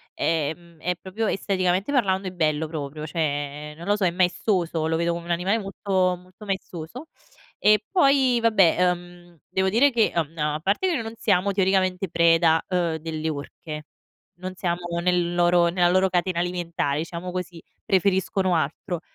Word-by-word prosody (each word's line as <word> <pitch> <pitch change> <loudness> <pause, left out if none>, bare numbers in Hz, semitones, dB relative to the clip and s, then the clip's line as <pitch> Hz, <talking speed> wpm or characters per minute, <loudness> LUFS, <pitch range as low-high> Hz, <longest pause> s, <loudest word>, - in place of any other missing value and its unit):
ehm, 165 +1 -2
è 180 +3 -1
proprio, 215 +4 -3
esteticamente 190 +2 0
parlando, 195 -8 +1
è 185 - -4
bello 155 -3 0
proprio,, 150 -1 -5
cioè 150 -1 -3
non 170 - -9
lo 205 - +3
so 200 -3 0
è - - +4
maestoso, 175 -2 0
lo 160 - 0
vedo 170 0 0
come 170 0 -6
un - - -10
animale 190 +6 +1
molto 190 -2 0
molto 185 +4 -15
maestoso. 190 - -5 0.5
E 210 0 +4
poi 275 -8 +4
vabbè, 200 -7 +4
ehm, 175 -1 -7
devo 190 0 0
dire 255 +8 +4
che, 235 -3 +2
mhmm, 165 -1 -2
a 150 0 0
parte 200 - +1
che 345 - +1
noi 230 - -2
non 225 0 -6
siamo 200 -3 +1
teoricamente 190 -1 +1
preda, 165 -1 +4
ehm, 175 -3 0
delle 160 0 -4
orche. 150 +1 -7 0.6
Non 185 +1 -6
siamo 175 -1 -2
nel 175 -1 +1
loro 175 0 +4
nella 175 0 +2
loro 185 +1 +3
catena 180 0 0
alimentare 170 -5 -1
diciamo 170 +2 -5
così. 175 -2 -5 0.2
Preferiscono 190 -1 +1
altro. 160 +3 -2
180 Hz, 165 wpm, -24 LUFS, 165-190 Hz, 0.6 s, è